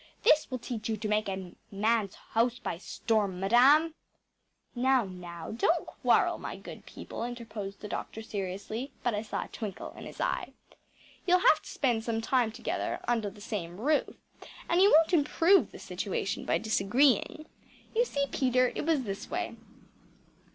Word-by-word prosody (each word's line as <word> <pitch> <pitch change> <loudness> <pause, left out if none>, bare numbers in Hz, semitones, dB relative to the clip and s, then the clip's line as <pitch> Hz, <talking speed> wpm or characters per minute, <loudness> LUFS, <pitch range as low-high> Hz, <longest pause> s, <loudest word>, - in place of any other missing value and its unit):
This 305 0 +5
will 255 - -2
teach 230 -2 -5
you 220 - 0
to 215 +1 -3
take 210 -1 +1
a 190 -2 -5 0.2
man’s 210 0 +1 0.2
house 235 +2 +2
by 170 - -4
storm, 200 -2 -1
madam!‚ÄĚ 270 - +5 0.8
“Now, 260 0 +3
now, 175 -3 -8
don’t 325 +9 +1
quarrel, - - +2
my - - -5
good - - -11
people,‚ÄĚ 235 - -6
interposed 220 -5 -7
the 210 - -6
doctor 220 +2 -5
seriously 205 +5 -4
but 245 - +1
I 210 - -1
saw 220 - -3
a - - -11
twinkle 205 -4 -6
in - - -9
his - - -10
eye. - - -1 0.7
“You’ll 360 0 +6
have - - +5
to - - -12
spend 240 -5 0
some 225 -1 -1
time 235 0 +1
together 230 +2 -3
under 230 -4 +1
the 205 +1 -15
same 195 -5 -5
roof 295 +6 +1 0.5
and 345 +2 +3
you 400 - +7
won’t 325 +3 +5
improve 335 +4 +4
the - - -10
situation - - -3
by - - +2
disagreeing. 235 +7 +2 0.5
You 470 - +5
see, 280 -10 -1
Peter, 255 -2 +2
it - - -4
was 310 -5 +2
this 195 -3 -5
way. 350 -8 -3
230 Hz, 165 wpm, -30 LUFS, 205-270 Hz, 0.8 s, you